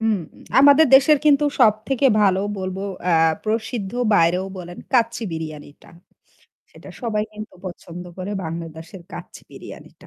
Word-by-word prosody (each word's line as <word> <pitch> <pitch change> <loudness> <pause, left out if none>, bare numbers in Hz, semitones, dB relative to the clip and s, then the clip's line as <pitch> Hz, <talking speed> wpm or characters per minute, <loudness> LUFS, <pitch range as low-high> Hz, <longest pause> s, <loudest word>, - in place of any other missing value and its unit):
হুম, 225 -1 +1 0.4
আমাদের 285 +3 +7
দেশের 280 +3 +6
কিন্তু 295 -1 +4 0.2
সবথেকে 225 +6 +3
ভালো 190 -2 +3 0.2
বলবো 185 0 -4 0.3
আ - - +3 0.3
প্রসিদ্ধ 220 -1 -3 0.2
বাইরেও 180 0 +2
বলেন 175 0 -9
কাচ্চি 235 -2 +1
বিরিয়ানিটা। 155 -3 -8 0.8
সেটা - - -15
সবাই 215 -3 -1
কিন্তু 215 -1 -9
পছন্দ 175 -1 -9
করে 185 +2 -5
বাংলাদেশের 165 +2 -8
কাচ্চি - - -10
বিরিয়ানিটা। - - -13
205 Hz, 125 wpm, -21 LUFS, 175-235 Hz, 0.8 s, আমাদের